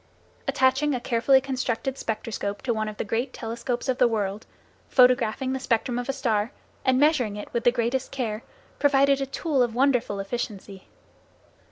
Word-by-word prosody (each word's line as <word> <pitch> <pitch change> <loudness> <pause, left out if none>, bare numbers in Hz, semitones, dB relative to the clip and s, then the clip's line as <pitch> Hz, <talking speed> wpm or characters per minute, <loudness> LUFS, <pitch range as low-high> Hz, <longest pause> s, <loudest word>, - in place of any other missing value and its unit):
Attaching 265 +2 +2
a - - -2
carefully 240 +3 +3
constructed 260 -1 -2
spectroscope 215 -4 -4
to 245 - 0
one 215 -1 -2
of 210 - -9
the - - -2
great 225 +5 -2
telescopes 240 +2 -4
of 260 -1 0
the 250 - +6
world, 210 -2 -2 0.4
photographing 250 0 +3
the 265 - -2
spectrum 245 -1 0
of 245 - -5
a - - +1
star, 230 -4 0 0.3
and 260 -1 +3
measuring 270 -8 +3
it 210 - -8
with 235 - -1
the 245 - +6
greatest 245 +2 -1
care, 230 -5 -3 0.4
provided 275 -1 +4
a 270 - -1
tool 275 0 0
of 240 -2 +1
wonderful 250 -6 +2
efficiency. 195 -2 -5
245 Hz, 170 wpm, -25 LUFS, 220-265 Hz, 0.4 s, the